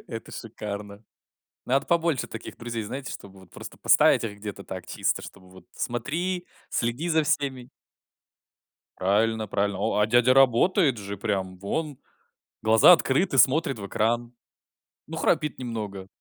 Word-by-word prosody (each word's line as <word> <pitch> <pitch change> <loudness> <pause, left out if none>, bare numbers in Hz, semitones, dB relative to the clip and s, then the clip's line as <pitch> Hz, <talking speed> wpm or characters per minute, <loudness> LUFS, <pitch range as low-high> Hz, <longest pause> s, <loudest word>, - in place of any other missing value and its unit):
Это 115 -2 -8
шикарно! 105 -1 -7 0.6
Надо 135 +2 +2
побольше 170 -5 0
таких 115 - -8
друзей, 115 -2 -5
знаете, 130 +5 -6
чтобы 95 -1 -11
вот 95 - -18
просто - - -10
поставить - - +4
их 105 -2 -6
где-то 100 -1 -7
так, 95 -2 -7
чисто, - - -1
чтобы 95 -2 -13
вот: 95 +5 -16
"Смотри, 175 +9 -3 0.2
следи 120 +9 -1
за 160 -2 +2
всеми". 135 -5 -1 1.3
Правильно 110 +3 +1
правильно. 100 -1 -1
О, - - 0
а 105 - +4
дядя 120 +2 +4
работает 135 - +4
же 100 0 -6
прям 95 -2 -2
вон 140 - -3 0.6
глаза 110 +9 +7
открыты, 160 -1 +1
смотрит 140 -2 +3
в 100 - -6
экран. 120 +3 -1 0.7
Ну, - - -6
храпит 150 -1 0
немного, 105 -6 -5
115 Hz, 140 wpm, -26 LUFS, 100-135 Hz, 1.3 s, глаза